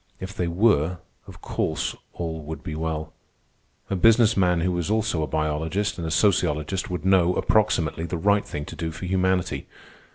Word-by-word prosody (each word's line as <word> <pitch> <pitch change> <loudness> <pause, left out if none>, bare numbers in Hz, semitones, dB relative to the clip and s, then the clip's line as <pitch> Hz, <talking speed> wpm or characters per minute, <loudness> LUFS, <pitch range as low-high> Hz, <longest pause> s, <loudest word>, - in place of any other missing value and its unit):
If 95 +1 -6
they 90 -5 -1
were, 90 -2 +2 0.3
of - - -12
course - - -2 0.2
all 80 -2 -4
would 80 +1 -7
be 80 - -5
well. 80 0 -3 0.8
A - - +1
business 115 +3 +5
man 90 -3 +2
who 90 +2 +1
was 90 0 -2
also 110 -6 +1
a 75 - -1
biologist 80 +6 -1
and 85 - -3
a - - -2
sociologist 85 -1 +1
would 90 0 -4
know, 90 -2 +4
approximately, 90 -7 +1
the 85 +1 -3
right 100 +4 +3
thing 75 0 -6
to 80 - -9
do 80 +1 -3
for 80 +3 -7
humanity. 95 -1 0
90 Hz, 175 wpm, -24 LUFS, 80-95 Hz, 0.8 s, business